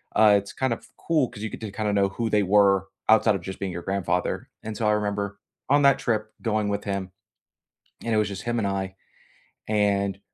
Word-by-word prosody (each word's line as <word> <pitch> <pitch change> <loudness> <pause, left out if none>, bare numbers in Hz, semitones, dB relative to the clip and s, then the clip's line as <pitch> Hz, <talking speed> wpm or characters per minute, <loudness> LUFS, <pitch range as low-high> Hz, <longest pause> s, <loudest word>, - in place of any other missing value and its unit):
uh, 105 -2 +7
it's 100 0 -5
kind 130 -1 -1
of 115 - -4
cool 155 -6 +1
'cause 110 -3 -9
you 110 - -2
get - - -8
to 110 -2 -5
kinda 105 +1 -1
know 100 -1 +3
who 115 +3 -2
they 105 -1 +3
were 95 -1 +4 0.2
outside 110 -1 +5
of 95 - -4
just 95 +2 -7
being 95 -1 -3
your 85 0 -5
grandfather, 95 -1 -1 0.2
and 110 -1 -5
so 110 - 0
I - - +4
remember 100 -1 -2 0.3
on 145 +1 +5
that 140 -1 +5
trip 110 -2 -1
going 110 -2 0
with 100 0 -2
him, 100 -2 -3 0.9
and 115 - -1
it - - +3
was 105 - +2
just 95 -1 -6
him 120 0 -1
and 105 - 0
I, 95 -1 -3 0.7
and, 100 -2 +1
105 Hz, 220 wpm, -25 LUFS, 100-110 Hz, 0.9 s, uh